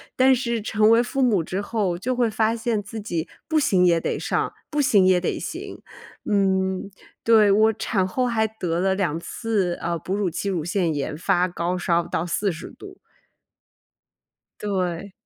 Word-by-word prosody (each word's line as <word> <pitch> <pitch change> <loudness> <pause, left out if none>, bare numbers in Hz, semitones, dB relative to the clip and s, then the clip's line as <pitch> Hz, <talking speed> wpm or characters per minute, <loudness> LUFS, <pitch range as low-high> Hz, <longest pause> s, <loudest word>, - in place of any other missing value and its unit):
但 260 +1 +5
是 235 -3 -1
成 215 0 +2
为 230 +1 +6
父 270 +2 -2
母 220 -9 +3
之 185 +5 -3
后， 200 -5 -1
就 250 +8 -2
会 240 -2 +2
发 220 +1 +1
现 225 -2 -1
自 205 +2 -8
己 170 -5 -3 0.2
不 315 -1 +2
行 185 -10 +3
也 170 -2 +4
得 - - -2
上， - - -1 0.2
不 300 -1 0
行 205 -8 +4
也 185 -1 +4
得 - - -2
行。 - - -7 0.5
嗯， 190 -1 +1 0.3
对， 220 -3 +5
我 215 +2 +4
产 200 -3 -1
后 250 +7 -1
还 220 -2 +1
得 180 -6 -3
了 190 +1 +1
2 170 -5 -1
次， 200 -1 -1
呃， 170 0 -1
哺 190 - -3
乳 200 -3 0
期 175 +4 -4
乳 175 -5 -1
腺 175 -1 0
炎， 145 +1 -3
发 180 +2 +1
高 175 0 -2
烧 170 -1 +1
到 160 - -2
40 175 -1 -2
度。 - - -13 1.6
对。 190 -2 -2
195 Hz, 180 characters per minute, -23 LUFS, 180-225 Hz, 1.6 s, 为